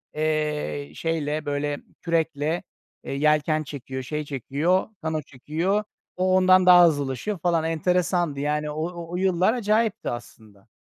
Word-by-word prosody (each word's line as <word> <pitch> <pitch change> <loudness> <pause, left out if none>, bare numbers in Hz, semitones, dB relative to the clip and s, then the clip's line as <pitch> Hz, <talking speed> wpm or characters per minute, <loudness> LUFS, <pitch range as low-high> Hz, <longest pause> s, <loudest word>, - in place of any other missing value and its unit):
eee, 150 - -1
şeyle, 155 - -2
böyle 145 0 -1 0.2
kürekle, 165 -1 0 0.4
eee, - - -5
yelken 155 +2 +2
çekiyor, 135 -2 -6
şey 150 +4 -3
çekiyor, 145 +7 0
kano 160 -1 -2
çekiyor. 160 +10 -2 0.3
O 185 0 +2
ondan 185 0 +5
daha 180 -1 +9
hızlılaşıyor 145 - -2
falan. 170 -1 +1
Enteresandı, 170 -1 0
yani. 150 +1 -1
O 165 +2 -4
o - - -3
yıllar 185 +2 +2
acayipti 225 -1 0
aslında. 110 -4 -10
155 Hz, 130 wpm, -24 LUFS, 145-180 Hz, 0.4 s, daha